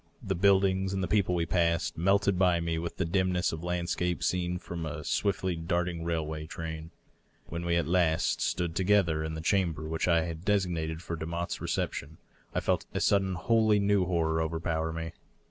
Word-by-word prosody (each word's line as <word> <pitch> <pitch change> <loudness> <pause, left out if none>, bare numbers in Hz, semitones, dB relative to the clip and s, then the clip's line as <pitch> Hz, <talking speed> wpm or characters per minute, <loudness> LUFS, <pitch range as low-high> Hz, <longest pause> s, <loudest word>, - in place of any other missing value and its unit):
The 100 -3 -1
buildings 95 0 +3
and 95 -1 -1
the - - 0
people 95 -2 +2
we 85 -1 +1
passed 85 -1 +1
melted 95 +2 +2
by 90 -2 +4
me 85 -1 -1
with 85 +1 -5
the 95 - 0
dimness 90 +1 +1
of 80 +1 -6
landscape 90 0 -1
seen 90 0 0
from 85 -1 -6
a 80 - -5
swiftly 95 -2 0
darting 85 +1 -1
railway 80 -2 -2
train... 80 0 -6 0.6
When 85 +1 -4
we 85 0 +1
at 85 -2 +2
last 85 -1 +2
stood 85 -2 -1
together 95 -5 +2
in 80 0 -3
the 80 - -5
chamber 85 -4 0
which 80 +2 -1
I 85 -2 +4
had 80 0 -5
designed 85 -5 0
for 85 - -4
Demotte's 85 +2 -3
recep - - -1
tion, 75 +3 -7 0.4
I - - +1
felt - - 0
a - - +1
sudden 95 -2 +2
wholly 110 +2 +3
new 100 -2 +3
horror 80 -2 +1
overpower 80 0 -1
me. 80 0 -4
85 Hz, 185 wpm, -29 LUFS, 80-95 Hz, 0.6 s, by